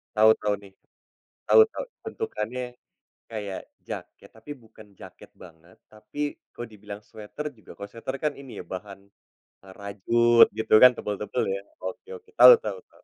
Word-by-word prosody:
Tau 110 +1 +7
tau 105 -1 0
nih. 100 -1 -15 0.8
Tau 445 - +8
tau, - - -5 0.2
bentukannya 125 - -5 0.5
kaya 105 -4 -6 0.3
jaket - - -9
tapi 145 - -11
bukan 110 -1 -16
jaket - - -13
banget, 85 0 -17 0.2
tapi 110 +6 -13 0.4
kalo 120 - -6
dibilang 105 0 -10
sweter 110 +7 -9
juga 110 - -15
kalo 100 0 -8
sweter 130 +4 -6
kan 150 - +1
ini 135 -3 -11
ya, - - -6
bahan 100 +1 -8 0.7
e - - -17
rajut, 115 +4 +4
gitu 110 - -1
kan, 125 - +10
tebel-tebel, 105 +4 -3
ya. 100 - -6 0.2
Oke 95 - -7
oke 445 0 -23
Tau - - +12
tau - - -4
tau. - - -25
110 Hz, 155 wpm, -26 LUFS, 100-125 Hz, 0.8 s, Tau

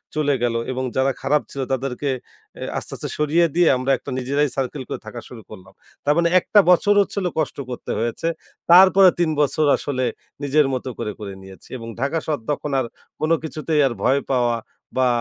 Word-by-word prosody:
চলে 145 -2 +2
গেলো 115 -1 +1
এবং 130 0 -3
যারা 135 +1 +2
খারাপ 150 +1 +2
ছিল 135 - -4
তাদেরকে 135 +2 -2 0.5
এ - - -3
আস্তে, - - -5
আস্তে - - -5
সরিয়ে 155 +3 +3
দিয়ে 175 -2 +4
আমরা 130 +2 0
একটা - - -10
নিজেরাই 140 +3 0
সার্কেল 135 +1 -2
করে - - -4
থাকা 120 +2 -7
শুরু 120 -3 -10
করলাম। 95 -4 -13 0.3
তার 145 - +4
মানে 170 0 +3
একটা 205 - +3
বছর 205 +3 +4
হচ্ছিল 200 -1 -2
কষ্ট 155 - -2
করতে 125 - -5
হয়েছে। 120 +8 -2 0.4
তারপরে 190 +1 +8
তিন 170 -2 +2
বছর 150 +1 +2
আসলে 130 -3 -3 0.4
নিজের 145 +1 +3
মত 130 - -3
করে, 105 - -2
করে 100 -2 -6
নিয়েছি। 95 -2 -14
এবং 115 -1 -9
ঢাকা 140 +4 0
শহর 150 -5 -1
তখন 145 0 -3
আর 130 - -1 0.3
কোন 155 +1 0
কিছুতেই 155 -1 -1
আর 120 - -3
ভয় 135 +2 +3
পাওয়া 120 -2 +2 0.4
বা 130 -1 +4
140 Hz, 190 wpm, -21 LUFS, 125-155 Hz, 0.5 s, তারপরে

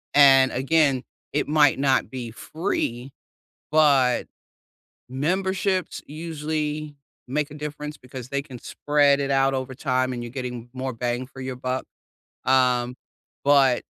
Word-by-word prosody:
And 135 -2 +7
again, 135 0 +2 0.3
it 145 - 0
might 150 -3 +4
not 135 -1 +2
be 125 -3 -5
free, 130 - -3 0.6
but 140 -5 +4 0.8
memberships 185 +7 -1
usually 155 -1 -4 0.3
make 150 +2 -1
a - - -9
difference 150 0 -6
because 125 -1 -9
they 140 0 -1
can 130 -4 -10
spread 145 -1 +2
it 140 0 -1
out 135 0 +3
over 130 0 -3
time 130 0 0
and 120 -1 -4
you're 120 - -6
getting 125 -2 -6
more 130 0 -3
bang 120 +2 -2
for 135 - -12
your 130 -1 -4
buck, 130 +1 -2 0.6
um, 125 -1 +3 0.5
but 135 -3 +4
135 Hz, 135 wpm, -24 LUFS, 130-150 Hz, 0.8 s, And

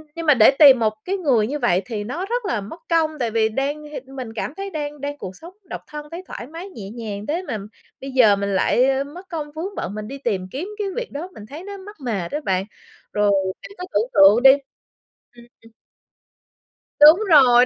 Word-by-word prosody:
nhưng 335 0 -5
mà 300 - +7
để 235 -1 +6
tìm 275 -5 +9
một 215 -2 +1
cái 390 +2 -1
người 260 - +2
như 295 +4 -3
vậy 190 -8 +2
thì 210 -1 -4
nó 295 - -4
rất 475 +2 -2
là 235 - -1
mất 220 - -10
công 325 -2 +2
tại 235 -3 -1
vì 220 0 +2
đang 280 +6 -2
h 300 0 -10 0.2
mình 250 -4 -6
cảm 230 +4 -4
thấy 395 0 -4
đang 295 -4 -5
đang 285 0 -4
cuộc 190 -7 -8
sống 340 - -12 0.2
độc - - -6
thân 300 0 -8
thấy 345 +2 -7
thoải 240 - -8
mái 335 +6 -8
nhẹ 210 - -9
nhàng 210 -3 -6
thế 330 +4 -1
mà 220 - -2 0.4
bây 270 0 -6
giờ 240 -6 +5
mình 200 0 -2
lại, 240 +6 +3
ơ, 270 0 +1
mất 350 +7 -12
công 305 -4 -5
vướng 345 +7 -6
bận, - - -4
mình 215 0 -6
đi 275 - -7
tìm 205 -9 -2
kiếm 310 +8 -4
cái 410 - -1
việc - - -4
đó, 300 +5 -5
mình 210 - -11
thấy 295 +9 -9
nó 400 +1 -8
mắc 405 +2 -11
mệt 200 -8 -2
á 295 - -2
bạn. 190 0 0 0.5
Rồi 210 -1 +3 0.3
bạn - - -11
cứ 360 - -6
tưởng 220 +4 +1
tượng 205 +4 +6
đi 265 - +10 0.8
ừm, 240 0 -15 0.2
ừm. 225 - -18 1.3
Đúng 305 +5 +9
rồi, 250 -6 +7
270 Hz, 230 wpm, -21 LUFS, 220-325 Hz, 1.3 s, đi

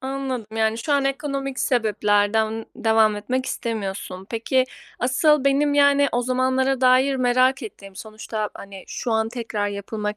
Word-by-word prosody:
Anladım. 265 -3 -4
Yani, 220 0 +1
şu 290 +6 -2
an 280 -1 +2
ekonomik 275 -1 -3
sebeplerden 220 -1 +1
devam 220 -1 +3
etmek 255 +5 -2
istemiyorsun. 195 -4 -4
Peki, 250 +3 +1 0.3
asıl 275 +3 +2
benim, 285 +1 +2
yani, 285 0 +4
o 245 - +1
zamanlara 260 +1 +1
dair 260 +2 +4
merak 255 +1 +2
ettiğim 195 -3 -10
sonuçta, 215 0 -5
hani, 195 -1 -10
şu 245 - -4
an 220 0 +1
tekrar 225 -4 -3
yapılmak 210 +1 -4
245 Hz, 140 wpm, -22 LUFS, 215-265 Hz, 0.3 s, yani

